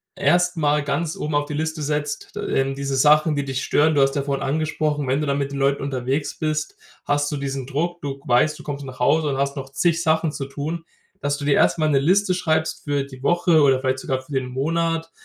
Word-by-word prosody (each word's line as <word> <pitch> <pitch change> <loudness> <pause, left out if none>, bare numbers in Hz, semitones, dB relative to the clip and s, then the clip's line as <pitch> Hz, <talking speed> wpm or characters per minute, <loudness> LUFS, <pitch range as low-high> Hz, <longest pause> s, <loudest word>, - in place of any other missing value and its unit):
erst 175 +4 +2
mal 150 -1 +2
ganz 150 +3 -2
oben 150 0 -3
auf 145 - +1
die 150 - -6
Liste 160 +1 -2
setzt, 150 0 -3
d - - -4 0.2
ähm, 135 0 0
diese 140 0 -3
Sachen, 150 +3 +4
die 145 - -1
dich 135 -1 -3
stören. 155 +2 +3
Du 145 - +3
hast 135 0 +2
ja 140 - 0
vorhin 140 -1 -2
angesprochen, 150 0 -1
wenn 135 +3 +1
du 150 - -2
dann 140 0 +1
mit 140 -1 -2
den 140 - -4
Leuten 140 0 +1
unterwegs 135 +1 -2
bist, 155 0 -2 0.3
hast 145 0 0
du 145 - -2
diesen 135 -2 -4
Druck. 170 +5 -2
Du 140 -2 -5
weißt, 150 +4 +3
du 150 - -12
kommst 145 -1 -5
nach 130 -2 -9
Hause 150 +5 +3
und 135 - -1
hast 140 0 -1
noch 135 -1 -6
zig 165 +2 +1
Sachen 160 -1 +2
zu 140 -2 -5
tun 155 +5 -5 0.4
Dass 145 0 0
du 145 - -5
dir 145 - +3
erst - - +3
mal 155 0 +2
'ne 140 -2 +3
Liste 185 +6 +3
schreibst 160 -3 -1
für 145 -2 0
die 130 -2 -12
Woche 175 -1 +3
oder 135 -2 +4
vielleicht 130 0 -1
sogar 130 0 -2
für 130 - -17
den 130 -1 -1
Monat. 165 +5 -1
145 Hz, 245 wpm, -22 LUFS, 135-155 Hz, 0.4 s, Sachen